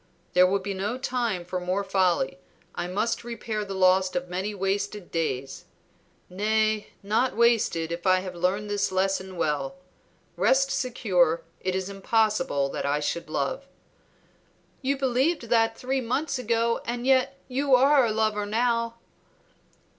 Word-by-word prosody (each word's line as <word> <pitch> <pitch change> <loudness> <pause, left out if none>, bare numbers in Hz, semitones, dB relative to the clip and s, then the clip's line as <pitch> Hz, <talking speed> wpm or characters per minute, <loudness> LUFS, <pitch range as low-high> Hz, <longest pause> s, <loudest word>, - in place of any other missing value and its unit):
There 180 +1 +6
will 195 +2 +2
be 200 +1 -4
no 205 +6 -2
time 240 -8 -2
for 180 +1 -3
more 185 +3 -1
folly; 185 -8 +1 0.3
I 175 - -3
must 215 +6 -1
repair 225 -2 -4
the 195 -1 -6
loss 185 0 +3
of 180 0 -2
many 190 +4 -3
wasted 200 0 -2
days, 135 -5 -3 0.6
nay, 215 +2 0 0.2
not 220 +5 +1
wasted 225 -9 +2
if 170 +3 -3
I 185 0 +4
have 185 -1 -6
learned 185 +4 -1
this 205 -1 0
lesson 190 0 -1
well. 150 -2 -1 0.6
Rest 270 +1 +3
secure; 185 -11 +1 0.2
it 185 0 -2
is 190 0 -2
impossible 200 -7 +1
that - - -4
I 145 +1 +1
should 160 +3 -3
love." - - -2 1.1
"You 275 +1 0
believed 265 0 0
that 225 -1 +3
three 265 +1 -1
months 255 +4 -1
ago 230 -1 0
and 240 +1 -4
yet 270 +1 +3
you 270 +1 +3
are 275 +2 +5
a 230 - +1
lover 215 -1 0
now." 230 +1 0
205 Hz, 145 wpm, -26 LUFS, 185-235 Hz, 1.1 s, There